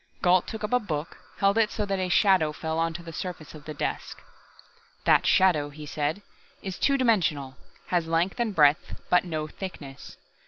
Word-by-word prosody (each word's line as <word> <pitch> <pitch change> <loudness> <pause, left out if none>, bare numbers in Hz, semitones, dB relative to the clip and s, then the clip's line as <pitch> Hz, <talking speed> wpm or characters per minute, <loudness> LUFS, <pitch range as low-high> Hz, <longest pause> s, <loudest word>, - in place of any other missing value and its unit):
Gault 180 -1 +4
took 220 -1 -6
up 210 - -2
a 250 - +5
book, 160 -8 -5 0.2
held 200 +2 +3
it 220 -2 +3
so 210 - -3
that 195 -1 -2
a 185 -1 -1
shadow 180 -2 +4
fell 160 +1 -3
onto 165 +1 -2
the 165 -1 -9
surface 170 -3 -6
of 150 -1 -12
the 155 - -6
desk. - - -4 0.9
"That - - +4
shadow," 165 -6 +3
he 150 +1 -10
said, 150 +6 -2 0.4
"is 190 -2 -5
two 275 -1 +3
dimensional, 160 - +1 0.3
has 175 -2 +1
length 170 +7 0
and 225 -4 -1
breadth, 150 -1 +3
but 180 0 +4
no 155 -3 -3
thickness. 150 -5 -9
170 Hz, 185 wpm, -26 LUFS, 155-195 Hz, 0.9 s, a